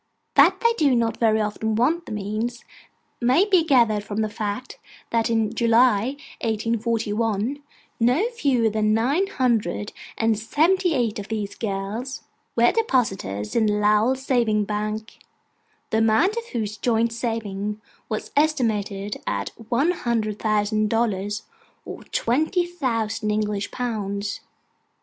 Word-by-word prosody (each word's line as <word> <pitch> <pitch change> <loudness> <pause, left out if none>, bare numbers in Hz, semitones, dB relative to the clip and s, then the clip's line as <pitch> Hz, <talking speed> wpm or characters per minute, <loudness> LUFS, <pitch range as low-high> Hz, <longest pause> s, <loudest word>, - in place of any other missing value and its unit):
That - - +5
they 465 0 +4
do 280 -5 +4
not 230 -1 0
very 220 -2 +3
often 215 +1 -1
want 310 +10 +1
the - - -7
means, 215 +3 -3 0.6
may 255 +11 +4
be 375 -5 +4
gathered 235 -9 +3
from 210 +1 -3
the 215 - 0
fact, 210 +4 -4 0.3
that 230 -1 +1
in 225 -1 +1
July, 235 +1 +3 0.3
1841, 225 +2 -1 0.4
no 250 - +3
fewer 270 - +1
than 215 0 +2
nine 280 - +1
hundred 235 - 0 0.2
and 225 -2 +1
seventy 335 - +2
eight 230 -5 0
of 200 - -7
these 210 -2 -3
girls 215 +5 -4 0.3
were 240 0 +5
depositors 195 - -1
in 225 -2 +3
the 210 - +2
Lowell 210 +4 +3
Savings 240 -6 +1
Bank: 215 +1 -4 0.7
the 220 - +2
amount 225 - +3
of 470 0 -4
whose 215 - -3
joint 230 0 +1
savings 210 -3 -3 0.3
was 215 - -4
estimated 220 -9 0
at 100 -1 -1 0.2
one 275 +8 +3
hundred 225 - -2
thousand 215 0 +1
dollars, 210 -2 -1 0.4
or - - -8
twenty 315 +9 +1
thousand 230 -10 -2
English 210 -1 -1
pounds. 205 -4 -3
225 Hz, 130 wpm, -23 LUFS, 210-250 Hz, 0.7 s, That